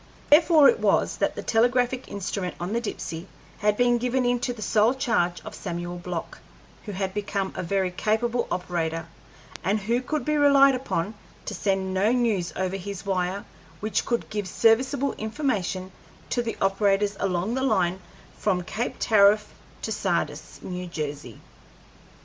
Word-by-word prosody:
Therefore 310 -1 +7
it 470 - +4
was - - +2
that - - 0
the - - -5
telegraphic 245 +2 +2
instrument 195 -2 -4
on 180 +4 -3
the 235 - 0
Dipsey 165 -6 -5 0.3
had 210 0 +2
been 245 -1 +3
given 250 +1 0
into 245 0 +1
the 225 -3 -6
sole 220 +5 +3
charge 200 -10 +1
of - - -7
Samuel 175 +1 -5
Block, 175 -1 -5 0.5
who 210 - -5
had 190 0 -2
become 200 -1 -2
a - - -2
very 185 +1 0
capable 225 +5 0
operator, 165 -3 -2 0.6
and 200 +4 +1
who 235 +5 0
could 285 0 -3
be 300 0 +1
relied 275 -1 +6
upon 220 -7 -2 0.3
to - - -4
send 190 -1 -1
no 195 +4 +2
news 225 -8 +1
over 190 +1 -1
his 200 +1 -7
wire 190 0 -1 0.3
which 215 -1 0
could 235 - -1
give 210 -2 -2
serviceable 255 +7 +2
information 215 -6 -2 0.4
to 245 - +1
the 230 -1 -4
operators 200 +1 +2
along 190 +2 0
the 260 - -1
line 190 -8 +1 0.4
from 185 -4 +1
Cape 225 +7 -3
Tariff 210 -1 +4 0.3
to - - -2
Sardis, - - -2
New 180 0 -5
Jersey. 145 -7 -5
205 Hz, 155 wpm, -25 LUFS, 185-240 Hz, 0.6 s, Therefore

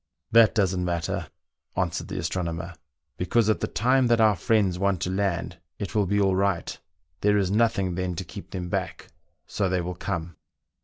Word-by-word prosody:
" - - -55
That 115 -1 +6
doesn't 95 -4 +1
matter," 85 -2 -2 0.5
answered - - -1
the - - -5
astronomer, 85 0 -3 0.2
" - - -55
be 90 - -2
cause 110 +2 +3
at - - -1
the - - -1
time 125 +7 +2
that 120 -1 +3
our 110 -2 +5
friends 95 0 +1
want 100 -2 +1
to 90 - -1
land 90 -3 -1 0.2
it 100 - -5
will 105 -3 +2
be 100 +2 +1
all 95 -2 +3
right. 95 -2 0 0.4
There 105 +2 +3
is 95 -2 +1
nothing 105 -4 +2
then 90 0 -2
to - - -4
keep - - -10
them 90 -1 -4
back, - - -4 0.4
so 100 -2 -1
they 90 -1 +1
will 90 +1 -4
come." 85 -3 -4
95 Hz, 200 wpm, -26 LUFS, 90-105 Hz, 0.5 s, That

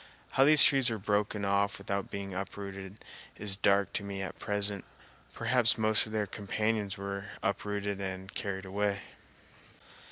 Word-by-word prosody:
How 135 - +4
these 150 0 +8
trees 135 -3 +5
were 110 - -2
broken 105 0 0
off 100 0 +1
without 100 0 -3
being 100 -1 -5
uprooted 100 +1 -7 0.3
is 100 -1 +1
dark 100 0 +2
to - - -1
me 100 -1 -4
at 95 - -7
present. 100 -1 +1 0.5
Perhaps 115 0 +3
most 110 0 +3
of - - -9
their 110 -1 0
companions 105 0 -2
were 100 0 -5 0.2
up 100 - 0
rooted 100 -1 -2
and 95 0 -5
carried 95 -1 -3
away. 100 +1 -1
100 Hz, 155 wpm, -31 LUFS, 100-105 Hz, 0.5 s, these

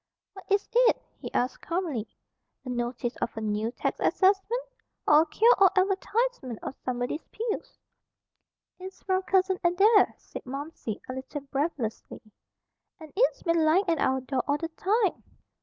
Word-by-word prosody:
"What 385 - -12
is 400 0 +2
it?" 485 0 +4 0.2
he - - -7
asked 250 +1 -1
calmly. 330 - -2 0.6
"A - - -6
notice 240 0 -2
of 225 - -3
a - - -3
new 215 +1 -1
tax - - -3
assessment? 405 +6 +2 0.4
Or 300 +1 +7
a - - +1
cure 460 +9 +5
all 385 -1 +7
advertisement 390 - 0
of - - -4
Somebody's 250 +4 -2
Pills?" 465 +2 -4 1.0
"It's 375 +1 -10
from 375 -1 +1
Cousin 380 0 +1
Adair," 395 +5 +4
said - - -10
Momsey, 275 -4 -6
a 255 - -4
little 265 +3 -6
breathlessly. 275 -4 -3 0.8
"And 315 -2 -12
it's - - +2
been 335 -2 +2
lying 330 +6 +4
at 330 -2 +1
our 265 0 +1
door 260 0 -1
all 285 0 +2
the 330 +2 -4
time." 395 +5 0
330 Hz, 155 wpm, -27 LUFS, 260-390 Hz, 1.0 s, Or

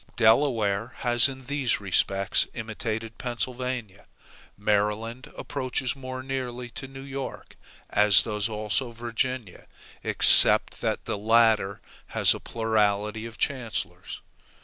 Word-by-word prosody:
Delaware 115 -2 +2
has 120 0 +4
in 130 -1 -9
these 135 -2 0
respects 100 0 +1
imitated 110 -1 -5
Pennsylvania. 125 -4 -4 0.5
Maryland 105 +6 -1
approaches 130 -1 -2
more 130 -1 -7
nearly 125 -2 -5
to 135 - -7
New 135 0 -10
York, 135 -1 -7 0.3
as 105 -2 +5
does 105 0 -2
also 110 +4 -1
Virginia, 120 -2 -4 0.4
except - - +5
that - - -2
the 100 - -3
latter 110 -2 +3 0.4
has - - +5
a - - -7
plurality 110 -1 -1
of 115 - -12
chancellors. 125 -5 -4
115 Hz, 110 wpm, -26 LUFS, 105-130 Hz, 0.5 s, as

